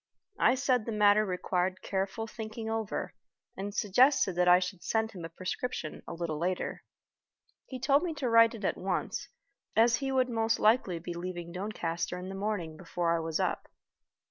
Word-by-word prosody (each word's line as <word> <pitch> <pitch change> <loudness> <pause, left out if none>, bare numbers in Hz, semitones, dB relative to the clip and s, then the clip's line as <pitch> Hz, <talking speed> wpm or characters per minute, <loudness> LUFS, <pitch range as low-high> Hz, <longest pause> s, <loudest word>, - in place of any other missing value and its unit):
I 255 - +5
said 255 -4 +1
the - - -1
matter 210 0 +5
required 185 0 -1
careful 195 +3 -2
thinking 220 0 -6
over, 225 -2 -3 0.4
and 200 +1 -4
suggested 225 +1 +3
that 180 +1 +2
I 180 0 +8
should 180 0 -3
send 220 0 0
him 180 -5 -9
a 165 - -5
prescription 185 0 -4
a - - -5
little 165 -3 -3
later. 180 +2 -2 0.8
He 260 - -6
told 280 +3 +3
me 340 -3 -3
to 280 -4 -2
write 230 0 +6
it 210 -3 -6
at - - 0
once, 185 -1 -2 0.5
as 235 +1 +5
he 270 -1 -2
would 260 -1 +2
most 225 -2 +1
likely 210 -5 +3
be 175 +1 -6
leaving 175 0 -5
Doncaster 180 -3 -3
in 180 +1 -6
the - - -5
morning 195 -6 -3
before 170 -1 -1
I - - 0
was 160 -1 -2
up. - - -1
200 Hz, 180 wpm, -30 LUFS, 180-230 Hz, 0.8 s, I